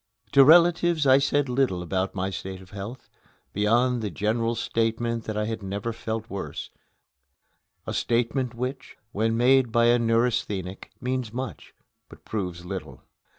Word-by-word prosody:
To 140 -1 +8
relatives 170 0 +5
I 135 0 +6
said 140 0 +1
little 125 -8 0
about 95 +3 -2
my 95 0 -2
state 95 0 -6
of 95 -1 -15
health, 105 +6 -8 0.5
beyond 120 +4 +2
the 105 - -2
general 115 +6 -1
statement 115 0 -1
that 110 -1 -4
I 105 - 0
had 110 0 -4
never 100 +4 -4
felt 110 -1 -4
worse 100 -3 -6 1.1
a - - -4
statement 120 +1 0
which, 130 +2 -5
when 115 +2 0
made 125 0 +4
by 115 +1 +4
a 120 +1 +5
neurasthenic, 115 -5 0
means 125 -2 -2
much, 130 -1 -6 0.3
but - - -16
proves 90 -5 -4
little. 80 -8 -7
115 Hz, 150 wpm, -26 LUFS, 100-125 Hz, 1.1 s, To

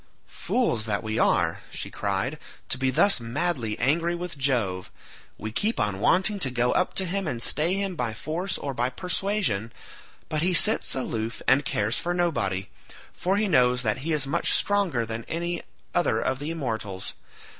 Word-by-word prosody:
"Fools 120 - -1
that 105 0 0
we 110 0 -2
are," - - +2
she - - -5
cried, - - -2 0.3
"to 125 - +1
be 130 0 +2
thus 195 +7 +4
madly 115 -1 -1
angry 165 +7 +1
with 175 -1 -5
Jove; 120 -10 0 0.5
we 110 +1 -5
keep 215 - 0
on 100 -2 0
wanting 195 - +3
to 135 - +1
go 125 0 +1
up 185 - +1
to 190 - 0
him 190 +1 -2
and 125 -6 -2
stay 160 +9 +1
him 195 -2 -2
by 125 -7 -1
force 175 - -3
or 140 - -4
by 125 0 0
persuasion, 180 - -1 0.6
but 155 - -1
he 180 +2 +2
sits - - +5
aloof 115 -3 -3
and 140 +1 +4
cares 105 +3 0
for 175 +1 -2
nobody, 100 - 0 0.5
for 190 +2 0
he 210 0 +2
knows 125 -7 +3
that 110 +2 +1
he 160 +5 -3
is 150 -3 +2
much 155 +5 +2
stronger 190 - +2
than 115 +1 -5
any 170 +1 -2 0.3
other 170 -10 +2
of 130 +2 -1
the 145 +2 -4
immortals. 110 - -4
135 Hz, 175 wpm, -26 LUFS, 115-175 Hz, 0.6 s, sits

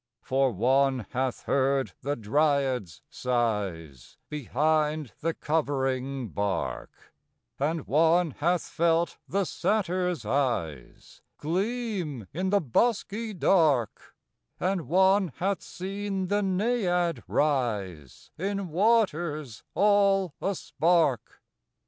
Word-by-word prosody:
For 135 0 +1
one 130 +3 +2
hath 130 0 -2
heard 135 0 +1
the 145 +2 -1
dryad's 130 - 0
sighs 100 - -2
Behind 150 0 0
the 165 +1 -1
covering 135 -4 -1
bark; 95 -11 -4 0.5
And 155 +2 -1
one 165 +3 +3
hath 170 +5 0
felt 170 0 0
the 195 0 0
satyr's 180 - -1
eyes 110 - -3 0.2
Gleam 185 - -2
in 185 +4 -1
the 200 +1 +3
bosky 215 - 0
dark; 150 - +2 0.4
And 185 -2 -1
one 190 -1 +3
hath 195 +2 -1
seen 195 0 -4
the 205 +1 +2
naiad 185 -4 0
rise 105 - -1
In 195 0 -2
waters 170 - +1
all 200 -4 +3
a 195 0 0
spark. 165 -9 0
155 Hz, 95 wpm, -27 LUFS, 130-190 Hz, 0.5 s, one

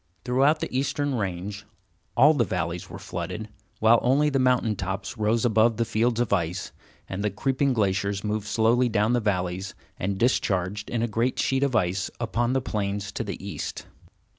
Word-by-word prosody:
Throughout 135 +5 +3
the - - -4
eastern 140 +2 0
range, 100 -2 -3 0.5
all 150 +3 +7
the 135 -6 +2
valleys 90 -3 -3
were - - -7
flooded, 90 +5 -5 0.3
while 115 +1 +5
only 145 +4 +3
the 135 - +1
mountain 125 -4 +2
tops 95 +3 -4
rose 110 +1 +1
above 110 0 +3
the 115 - +1
fields 115 +1 +1
of 120 -4 +1
ice, 90 -1 -1 0.4
and 95 +2 -4
the 105 - +2
creeping 135 +7 0
glaciers 100 -2 0
moved 105 0 -2
slowly 120 +3 +3
down 110 +1 +2
the 120 - +3
valleys 95 -3 -2 0.2
and 95 +1 -1
discharged 100 -3 0
in 115 -1 -1
a - - +1
great 115 +3 0
sheet 135 0 +1
of 140 -3 +1
ice 95 -1 +1
upon 120 +1 0
the 135 - +1
plains 100 -3 -2
to 110 - -3
the 100 -2 -6
east. 100 - -5
110 Hz, 180 wpm, -26 LUFS, 100-125 Hz, 0.5 s, all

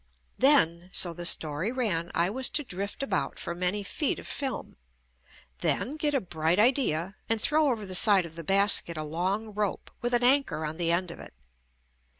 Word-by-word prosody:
Then, 180 - +3
so 175 -2 +3
the 175 +1 +1
story 155 +7 +1
ran, 205 -10 -1
I 170 +3 +1
was 260 +3 +2
to 295 - -2
drift 200 +2 -6
about 275 - -3
for 170 - -5
many 180 +4 -1
feet 285 +7 -1
of - - -10
film, 270 -4 -5 0.8
then 275 - -1
get 300 -2 0
a - - +2
bright 165 -3 -1
idea 210 - +1
and 225 0 +3
throw 300 +5 +3
over 220 -4 -4
the 185 - -8
side 195 -1 +4
of 165 -1 -12
the 165 - -8
basket 195 -2 +3
a 155 - -4
long 190 +8 -3
rope 205 -2 -4
with 240 +1 0
an 240 - 0
anchor 250 - +2
on 155 +1 -6
the 170 -1 +1
end 175 0 0
of - - -12
it. - - -13
195 Hz, 190 wpm, -27 LUFS, 170-245 Hz, 0.8 s, side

